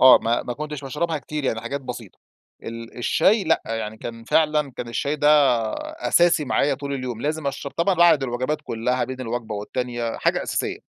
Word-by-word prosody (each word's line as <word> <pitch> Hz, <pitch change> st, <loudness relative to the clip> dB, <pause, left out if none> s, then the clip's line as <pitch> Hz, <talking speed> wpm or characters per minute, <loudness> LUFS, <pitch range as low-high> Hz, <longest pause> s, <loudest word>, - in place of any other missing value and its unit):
آه، 130 Hz, -1 st, +9 dB
ما 115 Hz, +1 st, 0 dB
ما 120 Hz, -, -4 dB
كنتش 150 Hz, +2 st, -6 dB
باشربها 155 Hz, +4 st, -2 dB
كتير 150 Hz, 0 st, -5 dB
يعني 115 Hz, -3 st, 0 dB
حاجات 140 Hz, +4 st, -4 dB
بسيطة. 120 Hz, -6 st, -8 dB, 0.4 s
ال 115 Hz, 0 st, -8 dB
الشاي 200 Hz, -, +3 dB
لأ، 160 Hz, -, +2 dB
يعني 110 Hz, -1 st, -3 dB
كان 115 Hz, 0 st, -8 dB
فعلًا، 150 Hz, +1 st, +2 dB
كان 120 Hz, -, -5 dB
الشاي 140 Hz, +6 st, -1 dB
ده 145 Hz, 0 st, +3 dB, 0.8 s
أساسي 170 Hz, +1 st, +4 dB
معايا 140 Hz, +1 st, +2 dB
طول 140 Hz, +1 st, -5 dB
اليوم، 125 Hz, -4 st, -4 dB
لازم 155 Hz, 0 st, -2 dB
أشرب 140 Hz, 0 st, -4 dB
طبعًا 175 Hz, +3 st, +2 dB
بعد 170 Hz, -4 st, +5 dB
الوجبات 130 Hz, +4 st, -1 dB
كلها، 125 Hz, +3 st, -1 dB
بين 130 Hz, +1 st, -7 dB
الوجبة 115 Hz, -2 st, -4 dB
والتانية، 120 Hz, +2 st, -3 dB
حاجة -, -, +1 dB
أساسية. -, -, -3 dB
130 Hz, 180 wpm, -23 LUFS, 120-150 Hz, 0.8 s, آه